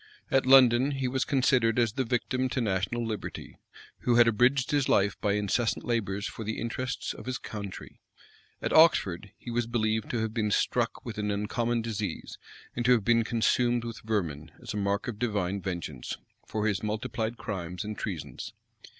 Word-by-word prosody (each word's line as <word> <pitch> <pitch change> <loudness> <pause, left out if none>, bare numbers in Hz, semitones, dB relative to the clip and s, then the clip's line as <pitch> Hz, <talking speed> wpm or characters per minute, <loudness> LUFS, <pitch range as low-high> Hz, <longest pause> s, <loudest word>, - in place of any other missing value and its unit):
At 135 -1 +3
London, 130 0 +7
he 135 -1 -1
was 130 +1 0
considered 125 -4 +2
as 115 -3 +2
the 130 - 0
victim 130 +2 0
to 125 - -1
national 110 +2 -1
liberty, 110 -3 -6 0.4
who 120 - +2
had 120 0 +7
abridged 125 +4 +3
his 145 -3 +1
life 100 +1 +3
by 100 -2 +2
incessant 105 +3 0
labors 100 -4 -1
for 115 - -5
the 110 +1 -3
interests 125 +3 -3
of - - -11
his 130 - -1
country:[] 100 -3 -8 0.6
at - - -1
Oxford, 105 - +4
he 120 - -8
was 120 0 0
believed 110 -2 0
to 120 - -1
have 110 -1 -2
been 110 -2 0
struck - - 0
with - - -5
an 105 0 -1
uncommon 115 +3 -1
disease, 105 -5 -4 0.4
and 120 - -1
to 125 - +6
have 115 -5 +1
been 115 -1 +4
consumed 120 +1 +1
with 115 -1 -6
vermin, 85 -9 -2
as - - -6
a - - -3
mark 100 0 0
of 110 -4 -5
divine 100 -5 -1
vengeance, 85 -8 -5 0.3
for 110 -1 -2
his 105 -3 +1
multiplied 110 +2 -2
crimes 90 -3 -4
and 105 0 -5
treasons. 75 -12 -5
110 Hz, 180 wpm, -28 LUFS, 100-120 Hz, 0.6 s, London